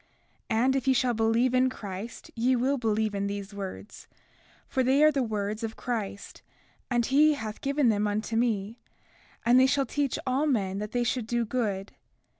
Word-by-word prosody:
And 250 +4 +2
if 270 0 -2
ye 265 - +4
shall 245 -1 +2
believe 225 +3 +2
in 255 0 +4
Christ 210 -1 -8
ye 250 +3 +2
will 260 +3 +1
believe 220 -2 0
in 200 0 -1
these 200 0 -5
words, 200 +1 -8 0.6
for 265 - 0
they 265 +3 +3
are 305 - +7
the 275 -2 0
words 215 -2 -2
of 225 -1 -4
Christ, 210 -5 -5 0.5
and 240 -2 +1
he 295 +4 +4
hath 220 -6 -6
given 280 -2 +2
them 210 -1 +1
unto 215 +2 -2
me; 225 -1 0 0.7
and 245 +2 +6
they 260 - +6
teach 280 0 0
all 270 +4 +1
men 200 -8 0
that 210 +1 -5
they 245 0 0
should 240 -1 -1
do 235 0 0
good. 210 -5 -2
235 Hz, 180 wpm, -28 LUFS, 210-260 Hz, 0.7 s, are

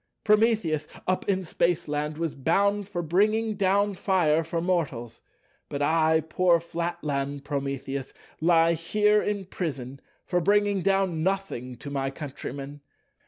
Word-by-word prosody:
Prometheus 210 -8 +2 0.2
up 185 +2 -1
in 190 -1 +1
Spaceland 150 -3 -1
was 165 -2 -2
bound 200 +8 +1
for 175 -4 -3
bringing 215 +7 +2
down 200 +1 +2
fire 170 -4 +2
for 165 +1 -3
mortals, 150 -10 -2 0.5
but 140 - -4
I—poor 160 +2 +3
Flatland 145 -5 -3
Prometheus—lie 140 +4 0
here 210 +6 +2
in 205 -2 -2
prison 135 -8 -5 0.2
for 180 -1 0
bringing 205 +1 +2
down 195 -3 +1
nothing 180 -10 -2
to 140 +4 -9
my 135 -1 -1
countrymen. 140 0 -7
165 Hz, 120 wpm, -26 LUFS, 145-195 Hz, 0.5 s, I—poor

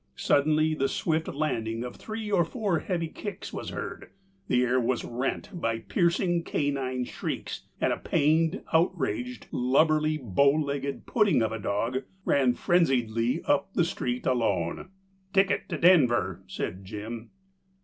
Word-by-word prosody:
Suddenly 155 +2 +3
the 135 -3 +1
swift 160 -1 0
landing 115 -6 -2
of 125 - -6
three 220 -1 -6
or 175 -4 +4
four 190 -1 -1
heavy 170 -2 -2
kicks 205 +4 -7
was - - -5
heard, - - -6 0.4
the 125 0 +3
air 125 +1 +2
was 120 0 0
rent 125 +10 -3
by 115 -10 -1
piercing 170 - +1
canine 135 -5 -1
shrieks, - - -5
and - - +2
a - - -3
pained, 160 +5 +1
outraged, 125 - 0
lubberly, 155 +4 +2
bow 140 +2 +3
legged 140 -2 -2
pudding 210 - +3
of 110 - 0
a 115 - -4
dog 115 +6 -1 0.2
ran 130 -3 +3
frenziedly 125 -6 +1
up 195 0 +1
the 175 - +3
street 125 -7 -3
alone. 110 - 0 0.4
"Ticket 195 0 +2
to - - -2
Denver," 120 - +4
said 95 0 -4
Jim. 110 +4 -7
140 Hz, 140 wpm, -28 LUFS, 120-170 Hz, 0.4 s, or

